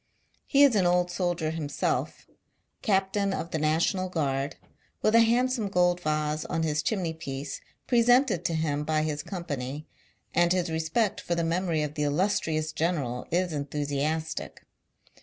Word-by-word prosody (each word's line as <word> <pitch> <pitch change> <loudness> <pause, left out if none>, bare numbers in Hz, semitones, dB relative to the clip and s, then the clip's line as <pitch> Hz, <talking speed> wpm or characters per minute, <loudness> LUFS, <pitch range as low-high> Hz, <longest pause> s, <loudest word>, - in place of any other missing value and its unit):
He 280 0 +5
is 280 -3 +6
an 185 -3 +3
old 180 0 +2
soldier 175 -3 -1
himself 155 -3 -2 0.3
— - - -48
captain 195 -1 +1
of 170 - -5
the 160 - -1
National 165 +5 +1
Guard, 140 -4 -1 0.5
with 215 - +3
a 230 - +7
hand 240 +3 +3
some 225 -5 -1
gold 180 -1 +2
vase 155 -1 -1
on 165 - -1
his 155 -1 0
chimneypiece, 160 - -3 0.2
presented 245 - +4
to 165 - 0
him 150 -2 0
by 155 0 +1
his 150 -1 -2
company 150 -5 -5 0.3
— - - -41
and 175 0 +4
his 180 -2 0
respect 165 +7 0
for 170 - -1
the 170 - 0
memory 165 -1 0
of 150 -1 -4
the 150 - -4
illustrious 155 0 0
general 145 -8 -2
is 175 0 0
enthu 145 0 -3
siastic. 155 +3 -2
165 Hz, 160 wpm, -27 LUFS, 150-185 Hz, 0.5 s, a